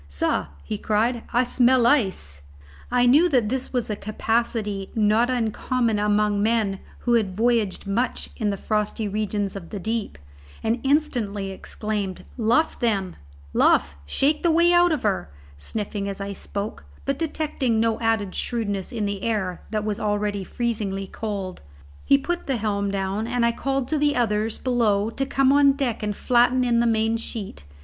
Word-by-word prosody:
"Sah," 70 0 -1 0.2
he 100 +9 -4
cried, 225 +3 +1
"I 245 +1 +3
smell 250 0 +3
ice!" 190 - +1 0.5
I 245 0 +3
knew 295 +8 +5
that 245 -8 +2
this 260 +1 -3
was 245 -3 -1
a 210 - -2
capacity 215 -2 -1
not 220 +2 +3
uncommon 235 -1 0
among 210 0 +2
men 215 -3 +1 0.2
who 240 - +1
had 200 -5 +1
voyaged 225 -4 +1
much 225 +6 -1
in 215 -4 -1
the 200 - -2
frosty 215 +1 -1
regions 205 -1 -2
of 175 -4 -8
the 205 - -5
deep, 220 - -3 0.5
and 225 +2 +1
instantly 240 -9 0
exclaimed, 200 -1 -4
"Luff, 240 +7 +1
then, 195 -6 0 0.4
luff! 70 0 +3
shake 290 - +1
the 340 - +3
way 340 +2 +4
out 350 0 +5
of 305 -5 -1
her!" 195 - 0 0.3
sniffing 200 - -4
as 195 - -5
I 200 0 -4
spoke, 200 - -5 0.2
but 275 - -1
detecting 300 -7 -1
no 225 0 +1
added 225 -4 0
shrewdness 205 -5 -2
in 225 -4 -2
the 200 -1 -3
air 190 -6 -1
that 215 -1 -2
was 210 -1 -2
already 205 -1 -1
freezingly 205 -2 -2
cold. 195 -2 -5 0.4
He 275 - +6
put 345 +5 -3
the 265 -3 0
helm 200 -2 -1
down, 195 +2 -2
and 240 0 +1
I 235 - +3
called 270 +1 -2
to 310 - +1
the 290 0 +2
others 220 -2 +1
below 225 -4 +1
to 270 - -2
come 270 0 +3
on 285 -1 +6
deck 270 -5 -2
and 210 -1 -2
flatten 250 +2 +3
in 240 -1 +2
the 235 - +3
main 225 0 +2
sheet. 205 - -6
220 Hz, 170 wpm, -24 LUFS, 200-245 Hz, 0.5 s, He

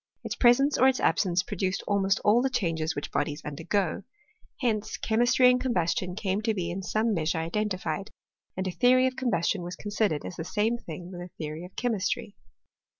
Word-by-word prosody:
Its - - -3
presence 270 +4 +4
or 260 - +6
its 265 -1 +2
absence 180 0 +2
produced 190 -1 -2
almost 195 -1 +2
all 220 +4 +4
the 265 - +1
changes 165 -9 -1
which 145 - -5
bodies 150 -1 -1
undergo. 165 +6 -1 0.6
Hence 220 -5 -1
chemistry 240 +3 +3
and 250 0 +1
combustion 180 -6 0
came 200 -1 -1
to 220 0 0
be 175 -3 -2
in 190 +3 -4
some 215 +4 0
measure 160 -2 0
identified, 185 +1 -2 0.5
and 190 0 -1
a - - -1
theory 255 +5 +4
of 260 0 0
combustion 200 -7 0
was 175 +1 -6
considered 205 -7 -1
Sis - - -7
the 160 - -3
same 215 +6 0
thing 175 -1 -8
with 175 -1 -7
a 175 - -8
theory 155 +1 -5
of 180 - -14
chemistry. 225 -1 -1
195 Hz, 185 wpm, -27 LUFS, 175-230 Hz, 0.6 s, or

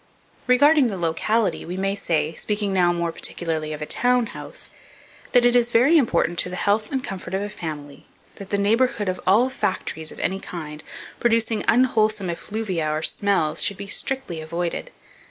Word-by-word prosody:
Regarding 285 +2 +5
the 200 -4 -3
locality, 185 +5 0
we 180 +2 -6
may 195 +1 0
say, 160 -5 -1
speaking 205 +3 -2
now 180 -2 +3
more 170 -1 -1
particularly 160 -2 -2
of 150 0 -5
a - - -3
town 245 +6 +2
house, - - -7 0.6
that 245 -1 +5
it 245 0 +4
is 240 -1 +4
very 245 +8 +4
important 175 - +2
to - - +1
the 180 - -5
health 205 +5 0
and 265 -2 -1
comfort 190 0 -5
of 195 - -1
a 205 - -4
family, 150 -7 -7 0.3
that 195 -1 -9
the 200 - 0
neighbourhood 215 +1 +1
of 185 0 -2
all 215 +7 +5
factories 160 - -3
of - - -12
any 190 +1 -1
kind, 155 -5 -8 0.4
producing 230 -2 +1
unwholesome 215 -6 +2
effluvia 185 -3 -3
or 155 +1 -2
smells, 165 -2 +2
should 200 - +1
be 200 - -6
strictly 205 - -3
avoided. 170 - -3
195 Hz, 175 wpm, -23 LUFS, 170-230 Hz, 0.6 s, Regarding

